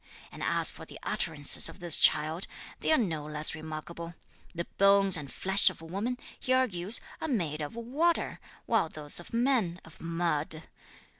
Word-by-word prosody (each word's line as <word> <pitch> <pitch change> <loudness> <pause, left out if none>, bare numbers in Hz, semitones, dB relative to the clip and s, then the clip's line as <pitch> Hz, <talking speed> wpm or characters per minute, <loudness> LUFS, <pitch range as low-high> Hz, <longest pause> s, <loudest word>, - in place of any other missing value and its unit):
And - - -11
as - - +2
for - - -12
the - - -12
utterances 150 -1 +3
of 165 - -13
this 175 -3 +5
child, 155 +4 +2 0.3
they - - 0
are 315 - +5
no 165 -10 -2
less 150 0 +1
remarkable. 160 +2 -8 0.4
The 170 0 -3
bones 195 -1 +5
and 145 -4 -4
flesh 190 +1 +4
of - - -11
woman, 200 +10 -4 0.2
he 255 - -4
argues, 215 -5 +2 0.2
are - - -3
made 165 - -2
of 150 +8 -6
water, 285 +9 -1 0.3
while 225 -8 +1
those 150 0 +5
of 175 - -12
man 230 -8 0
of 165 - -16
mud. 165 -2 -2
175 Hz, 165 wpm, -29 LUFS, 155-225 Hz, 0.4 s, this